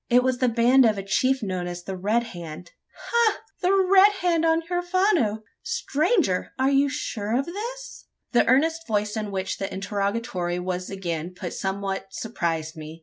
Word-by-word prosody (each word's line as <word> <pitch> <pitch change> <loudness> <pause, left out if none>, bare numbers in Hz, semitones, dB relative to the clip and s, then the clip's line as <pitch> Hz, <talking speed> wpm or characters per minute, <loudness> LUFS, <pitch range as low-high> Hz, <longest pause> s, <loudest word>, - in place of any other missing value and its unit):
It 250 0 +5
was 255 -1 0
the 255 - +3
band 240 +3 +5
of 220 -3 +3
a 195 - -4
chief 255 +6 +1
known 185 -3 -2
as 175 0 -6
the 190 - -5
Red 210 +6 +1
Hand." 170 - -8 0.4
"Ha! 470 -3 +3 0.2
The 365 0 +3
Red 390 +1 +6
Hand 335 -2 +2
on 325 0 +3
the - - -19
Huerfano! 350 - +1 0.2
Stranger! 355 - 0
are 265 +1 +2
you 280 +1 +3
sure 225 -6 -2
of 275 - 0
this?" 470 +8 -7 0.3
The 240 - +3
earnest 320 +6 +2
voice 210 -1 0
in 215 -1 -3
which 190 -1 -3
the 195 - -3
interrogatory 195 -2 -2
was 180 0 -3
again 175 -3 -4
put 180 -2 -5
somewhat 195 0 -3
surprised 165 -7 -3
me. 155 +1 -9
230 Hz, 175 wpm, -25 LUFS, -, 0.4 s, Red